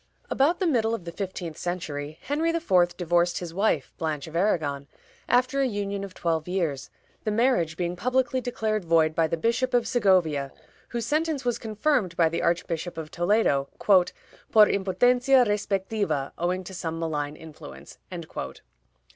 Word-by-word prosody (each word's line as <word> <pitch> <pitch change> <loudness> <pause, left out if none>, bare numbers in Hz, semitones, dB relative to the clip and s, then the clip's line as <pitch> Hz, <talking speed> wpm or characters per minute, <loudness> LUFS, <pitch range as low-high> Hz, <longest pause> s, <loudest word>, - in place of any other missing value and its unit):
About 300 +6 +2
the 380 - +1
middle 230 -8 +2
of 185 - -9
the 170 - -5
fifteenth 180 -4 -5
century, 155 -4 -4
Henry 305 +4 0
IV. 185 - +2
divorced 175 0 +1
his 175 -2 -5
wife, 180 -8 0
Blanche 155 -3 -2
of 160 - -10
Aragon, 155 -7 0 0.4
after 255 +3 +3
a 270 - +3
union 200 -3 -3
of 195 -2 -8
twelve 165 -2 -1
years, 170 -7 -2 0.3
the - - -1
marriage 210 -8 +1
being 175 0 -2
publicly 255 +4 0
declared 220 -4 -2
void 165 -2 +3
by 165 0 +2
the 165 - -2
Bishop 245 +7 0
of 240 -2 +2
Segovia, 180 - +2 0.4
whose 235 -1 -3
sentence 305 -3 0
was 245 -1 0
confirmed 215 - 0
by 165 -2 +4
the 165 - -2
Archbishop 170 0 -1
of 155 -1 -6
Toledo, 175 -7 +2
"por 185 -3 +4 0.6
impotencia 245 +7 +3
respectiva, 195 -7 -1
owing 180 +2 -1
to 190 - -9
some 165 -3 -4
malign 150 -3 -2
influence." 155 -1 -12
185 Hz, 155 wpm, -26 LUFS, 165-230 Hz, 0.6 s, by